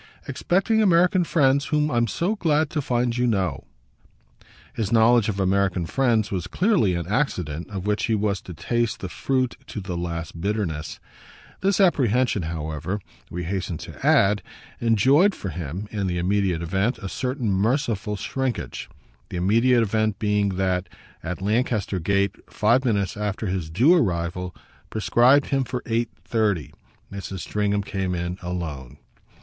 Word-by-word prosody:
"Expecting 195 +5 +1
American 180 -1 +4
friends 140 -4 +2
whom 150 0 +1
I'm 120 -1 +2
so 175 - -1
glad 155 -5 +1
to 150 - -1
find 120 -2 0
you 125 0 +1
know!" 95 -5 -1 1.1
His 110 -4 -2
knowledge 115 0 +5
of 100 -2 -2
American 95 -2 +1
friends 115 0 +1
was 90 -4 -2
clearly 180 - +2
an 85 -1 -3
accident 90 - -2
of 95 -2 -5
which 105 0 0
he 115 - +1
was 100 -2 0
to 90 - -9
taste 115 +7 -1
the 95 - -4
fruit 130 +7 -1
to - - -5
the 95 -2 -5
last 85 -1 -4
bitterness. 95 -6 -2 0.6
This 195 +1 +1
apprehension, 130 - +3
however, 80 +4 -3 0.3
we 90 +1 -4
hasten 90 -1 -3
to - - -10
add, 100 +1 +4 0.4
enjoyed 135 - +4
for 95 - -5
him, 85 +4 -5
in 100 -3 -2
the 90 -1 -1
immediate 90 -1 +1
event, 95 +8 0
a 95 - -6
certain 125 0 -2
merciful 105 0 0
shrinkage; 120 - -3 0.4
the - - -5
immediate 115 +7 +3
event 110 -1 0
being 105 -1 +1
that, 90 -1 0 0.3
at 90 +3 -5
Lancaster 105 -2 0
Gate, 100 +2 +1 0.2
five 115 +5 +3
minutes 100 -7 0
after 105 0 -3
his 90 -5 -2
due 125 - +5
arrival, 90 - 0 0.3
prescribed 125 +5 +3
him 135 -1 +2
for 125 0 -4
eight 115 0 0 0.2
thirty, 100 - 0 0.4
Mrs. 95 -2 -6
Stringham 105 -1 0
came 95 -2 -2
in 85 +2 -3
alone. 80 -7 -5
105 Hz, 150 wpm, -24 LUFS, 90-125 Hz, 1.1 s, knowledge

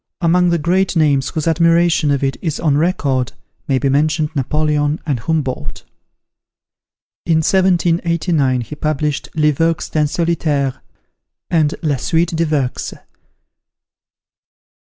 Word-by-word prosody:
Among 180 +1 +3
the 170 - +2
great 180 +4 0
names 145 -4 +2
whose 155 0 -3
admiration 165 -1 +3
of 140 -1 0
it 135 0 0
is 160 -3 -3
on 150 -4 +1
record, 145 -6 0 0.3
may 135 - +2
be 140 - 0
mentioned 150 +2 +1
Napoleon 150 +2 0
and 140 -6 -1
Humboldt. 130 - -3 1.4
In 165 -2 +3
1789, 170 -6 +1
he 120 - -8
published 150 -1 -2
"Les 150 -1 +3
Vœux 165 +3 -1
d'un 150 -1 +1
Solitaire," 150 -5 -1 0.7
and 155 -3 +2
"La 145 -4 +1
Suite 165 +5 0
des 165 +1 +1
Vœux." 140 -5 -2
155 Hz, 120 wpm, -17 LUFS, 140-165 Hz, 1.4 s, Among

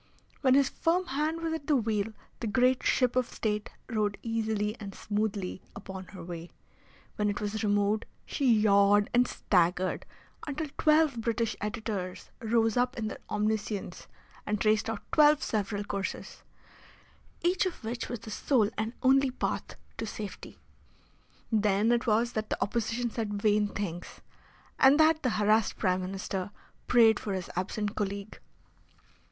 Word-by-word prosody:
When 260 -2 +5
his 275 -1 +5
firm 355 +3 +1
hand 310 +3 -1
was 325 -1 -1
at 320 -3 -5
the 300 - +4
wheel 220 -3 0 0.3
the 230 - -3
great 250 +4 +3
ship 250 -2 +2
of 255 -1 +1
State 210 -1 -2 0.2
rode 210 -4 -1
easily 220 -2 -1
and 200 -3 -7
smoothly 205 -3 -2
upon 190 -2 -8
her 185 -2 -10
way; 170 0 -7 0.7
when 210 0 +1
it 205 - -2
was 210 +1 -3
removed 205 +1 +1 0.2
she 270 -4 +1
yawed 205 -1 +4
and 245 +1 +4
staggered 180 0 +1 0.4
until 300 +2 -2
twelve 305 -6 +4
British 230 0 -1
editors 205 -3 -4
rose 225 -1 +2
up 250 +2 +1
in 220 -2 -2
their - - -7
omniscience 210 -1 -2 0.4
and 210 0 -1
traced 215 +1 +2
out 225 -2 -4
twelve 300 -1 +5
several 205 -1 -1
courses, 200 -1 -5 1.0
each 360 +2 +2
of 350 - -7
which 235 +2 -4
was 240 -3 -5
the 220 - -9
sole 220 -2 +2
and 220 +2 -2
only 270 +1 +5
path 250 - -3 0.2
to 225 - -2
safety. 210 -1 -7 0.9
Then 210 0 +3
it 240 +1 +1
was 230 +2 +2
that 215 -1 -3
the - - -2
Opposition 230 +3 -1
said 210 -3 -3
vain 210 0 +3
things, 180 -4 -4 0.7
and 275 +3 +6
that 315 0 +5
the 255 - +1
harassed 215 +1 +2
Prime 185 0 +1
Minister 190 0 -4 0.4
prayed 225 -3 +5
for 205 - -3
his 185 -2 -4
absent 205 +3 -2
colleague. 200 0 -4
215 Hz, 150 wpm, -29 LUFS, 205-245 Hz, 1.0 s, and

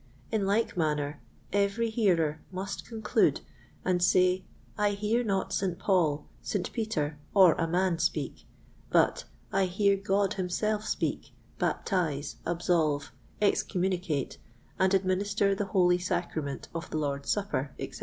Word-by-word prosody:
In 210 -3 +1
like 215 +3 +1
manner, 150 -4 -1 0.3
every 200 +3 +1
hearer 165 -9 +2
must 190 +1 -5
conclude 220 -2 +1 0.4
and 180 -1 +2
say, 185 +1 +3 0.3
I 205 -1 +2
hear 215 +4 0
not 195 -4 -1
St. 185 -3 0
Paul, 160 -7 +1 0.2
St. 200 -4 -3
Peter, 160 -10 -2 0.2
or 185 -5 +8
a 165 - -1
man 175 0 +1
speak; 160 -3 -2 0.4
but - - +3 0.3
I 195 0 +3
hear 200 +2 +2
God 195 0 +1
himself 210 +3 -1
speak, - - -2 0.2
baptize, 155 -7 -1
absolve, 160 -4 +1 0.3
excommunicate, 180 -7 0 0.4
and 190 0 +4
administer 200 +2 +1
the 200 +1 -1
holy 180 -3 +3
sacrament 160 -6 -3
of 165 +1 -5
the - - -2
Lord's 140 -2 -2
Supper, 195 -10 -1
etc." - - -6
185 Hz, 130 wpm, -29 LUFS, 160-200 Hz, 0.4 s, or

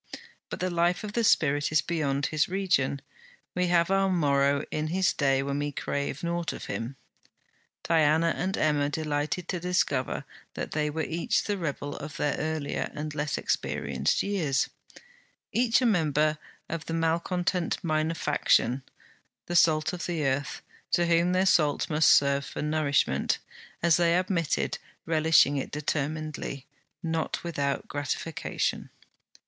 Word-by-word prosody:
But - - -5
the 185 0 0
life 175 +2 +1
of 210 -1 -5
the 235 - +1
spirit 145 -8 +3
is 155 - +4
beyond 145 -5 -1
his 155 +2 +1
region; 175 -8 0 0.5
we 180 0 +1
have 175 +1 +3
our 195 0 +3
morrow 140 -4 +2
in 155 0 -1
his 185 +4 +1
day 135 -2 +2
when 140 +1 -2
we 145 0 -2
crave 140 +1 -3
nought 170 -1 -1
of - - -7
him. 120 +4 -4 0.9
Diana 160 0 +3
and 190 +2 -2
Emma 145 -2 +2
delighted 150 +3 -2
to 180 - -1
discover 170 -7 0 0.3
that - - -4
they 150 -1 0
were 160 +2 -2
each 165 +2 0
the 205 - -1
rebel 145 -5 -4
of 150 +3 -7
their 145 -3 0
earlier 155 -2 -2
and 150 0 -4
less 150 0 -2
experienced - - -1
years; 170 -10 0 0.8
each 240 +1 +3
a - - +3
member 155 - +2 0.3
of 165 -1 -5
the 165 - -2
malcontent 170 +2 0
minor 155 0 0
faction, 135 -4 +2 0.6
the 175 - -4
salt 155 -2 +4
of 180 0 -4
earth, 145 -4 -1 0.3
to 175 - +3
whom 170 +1 +3
their 185 +1 +2
salt 155 -5 +2
must 155 0 +4
serve 140 0 +4
for - - -5
nourishment, 145 - +1 0.5
as 170 -2 +5
they 170 0 +3
admitted, 180 -4 0 0.3
relishing 160 -3 +4
it 135 - -3
determinedly, 150 -1 -3 0.4
not 165 -1 -2
without 140 -5 -2
gratification. 145 +2 -3
155 Hz, 145 wpm, -28 LUFS, 145-175 Hz, 0.9 s, as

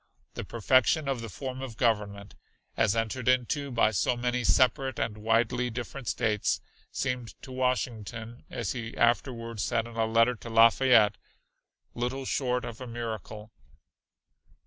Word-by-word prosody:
The - - -5
perfection 130 +6 +2
of 135 -4 -1
the 115 - -6
form 130 +4 -6
of 125 -5 -7
government, 105 -4 0 0.4
as 110 -1 +2
entered 115 +2 -2
into 130 +3 +1
by 115 -3 +3
so 110 +5 +1
many 125 0 -1
separate 130 +2 +2
and 105 - -2
widely 115 +3 +1
different 120 +2 -6
States, 110 -4 0 0.3
seemed 125 -3 -3
to 130 - -9
Washington, 120 -3 -3
as 115 -5 -3
he 115 -2 -6
afterward 115 -1 0
said 115 +1 0
in 115 -1 -10
a 110 -1 +2
letter 115 +2 +4
to 115 0 -10
Lafayette, 115 -2 +5 0.8
"little 125 +3 -3
short 125 -2 -1
of 115 +1 -8
a 130 - -6
miracle." 110 -2 -6
120 Hz, 145 wpm, -28 LUFS, 110-125 Hz, 0.8 s, Lafayette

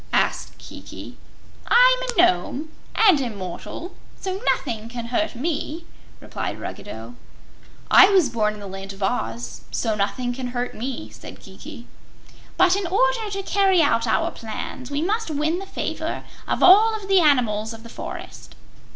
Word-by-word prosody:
asked - - 0
Kiki. - - -10 0.5
"I'm - - +6
a - - -3
Nome, 290 - +2 0.2
and 385 -10 +5
immortal, 215 - -6 0.3
so 380 +1 -4
nothing 225 -3 -3
can 235 -1 -6
hurt 315 +1 0
me," 315 +4 -3 0.3
replied - - -5
Ruggedo. 115 - -8 0.8
"I 390 - +9
was 375 -7 +4
born 215 -3 0
in - - -11
the 205 - -8
Land 195 0 -7
of 195 0 -7
Oz, 115 - -3
so 225 -2 -1
nothing 210 +5 -1
can 255 0 -5
hurt 245 0 -2
me," 255 +3 -5
said - - -11
Kiki. - - -11 0.7
"But, 370 0 +5
in 395 -2 -2
order 455 +3 +1
to 390 -1 -4
carry 380 -3 +3
out 230 -5 +2
our 220 - +1
plans, 235 +3 -7
we 290 +2 -1
must 430 +2 -1
win 310 +3 0
the 390 - -8
favor - - -4 0.2
of - - 0
all 430 +4 +7
the 390 -1 +5
animals 235 -9 +2
of 225 0 -10
the - - -10
forest." - - -9
275 Hz, 155 wpm, -23 LUFS, -, 0.8 s, I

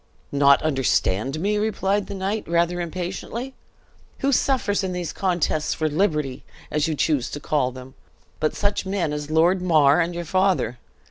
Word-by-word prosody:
"Not 140 0 +5
understand 135 -3 0
me?" 205 +4 0
replied 205 -1 0
the - - -6
knight, 195 +3 -2
rather 170 +1 +1
impatiently. 185 +9 -5 0.7
"Who 275 - +2
suffers 245 -7 +1
in 185 -1 -2
these 180 -2 -4
contests 175 -5 0
for 155 - 0
liberty, 150 -5 0 0.3
as 150 0 +1
you 160 - -1
choose 145 -4 +1
to 145 - -6
call 140 -4 0
them, 130 +1 -11 0.5
but 155 - 0
such 205 0 0
men 190 -6 -1
as 150 0 -5
Lord 170 +4 +3
Mar 155 -3 +4
and 170 +1 -2
your 175 0 -4
father? 185 - +1
170 Hz, 160 wpm, -23 LUFS, 150-195 Hz, 0.7 s, Not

